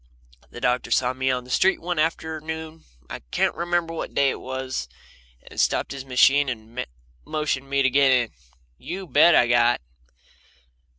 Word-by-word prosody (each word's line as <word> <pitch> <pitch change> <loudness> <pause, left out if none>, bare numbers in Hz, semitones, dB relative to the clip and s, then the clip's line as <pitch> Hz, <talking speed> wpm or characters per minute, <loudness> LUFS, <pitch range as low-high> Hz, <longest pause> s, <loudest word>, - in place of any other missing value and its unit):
The - - -10
doctor 125 +1 0
saw 125 0 +2
me 130 +1 -1
on 125 -1 -1
the 125 - -11
street 190 +7 +3
one 175 -1 -3
afternoon 160 0 -3 0.2
I - - -7
can't - - +1
remember 170 -1 -1
what 165 - -6
day 140 -1 +3
it - - -6
was 130 - -4 0.6
and - - -9
stopped - - 0
his 135 -1 -7
machine 135 +2 +4
and 115 0 -6 0.4
motioned 150 - -2
to - - -19
me 140 0 +2
to 135 - +4
get 140 +1 +4
in. 120 -3 +2 0.5
You 190 +2 -6
bet 155 +3 +5
I 120 - +5
got. 120 0 +3
135 Hz, 170 wpm, -24 LUFS, 125-160 Hz, 0.6 s, bet